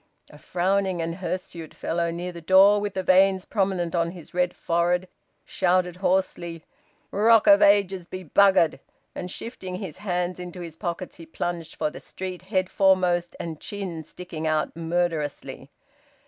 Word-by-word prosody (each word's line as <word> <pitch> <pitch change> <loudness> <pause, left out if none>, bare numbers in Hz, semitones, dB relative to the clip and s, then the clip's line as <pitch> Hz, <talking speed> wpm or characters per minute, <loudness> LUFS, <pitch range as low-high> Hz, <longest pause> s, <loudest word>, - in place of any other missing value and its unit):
'" - - -46
A 150 - -14
frowning 190 +1 0
and 165 0 -2
hirsute 175 -3 -5
fellow 170 0 -1
near 175 +2 -4
the 170 -1 -10
door, 195 +4 +6
with 205 -1 -4
the 190 - -1
veins 190 0 +4
prominent 190 -5 -1
on 170 -1 +1
his 170 -3 -12
red 180 0 0
forehead, 175 +2 0 0.4
shouted 180 0 +1
hoarsely, 180 -3 -1 0.5
"`Rock 220 +2 +5
of 200 0 +7
Ages' 195 -3 +3
be 185 0 -7
buggered!" 185 -2 +4 0.3
and 180 - -6
shifting 185 -3 -6
his 185 -5 -6
hands 180 -2 -2
into 180 0 -7
his 165 -2 -8
pockets 175 +1 -5
he 165 -2 -11
plunged 165 0 -4
for 150 - -1
the - - -9
street, 185 -1 -7
head 185 -1 -1
foremost 180 -3 +2
and 160 -2 -5
chin 185 -6 -5
sticking 160 -1 -6
out 155 0 0
murderously. 165 -2 -2
180 Hz, 160 wpm, -25 LUFS, 170-190 Hz, 0.5 s, of